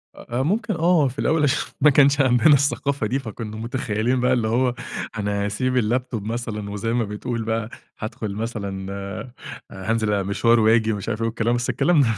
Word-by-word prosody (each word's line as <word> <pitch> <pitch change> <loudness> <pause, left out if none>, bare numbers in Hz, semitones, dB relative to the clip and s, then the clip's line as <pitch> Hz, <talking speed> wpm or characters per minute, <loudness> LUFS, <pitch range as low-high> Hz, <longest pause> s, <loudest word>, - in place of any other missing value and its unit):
أ 120 +2 -5
أ - - +2
ممكن 210 - 0
آه، 165 -3 +3
في 130 +2 -7
الأول 160 -1 +2
عشان 145 0 0
ما 150 - +7
كانش 140 +1 +5
عندنا 125 +3 +5
الثقافة 140 -3 +1
دي، 130 +5 0
فكنّا 110 -3 -7
متخيِّلين 115 +1 -1
بقى 125 +1 +2
اللي 120 -3 +1
هو 125 +2 +1 0.4
أنا 100 0 -1
هاسيب 125 +5 0
الlaptop 120 0 -1
مثلًا 110 -1 -4
وزي 105 +3 -2
ما 120 -1 +1
بتقول 115 +3 -4
بقى، 110 0 -2 0.3
هادخُل 110 -2 -5
مثلًا 100 -4 -4
آآ، 100 +5 -6 0.4
هانزِل 105 +2 -1
أ 100 - +1
مشوار 115 +4 +3
وآجي 110 0 +4
ومش 105 +2 -4
عارف 110 0 -3
والكلام، 115 +1 0
بس 120 0 -2
الكلام 165 -5 +3
115 Hz, 180 wpm, -23 LUFS, 105-130 Hz, 0.4 s, ما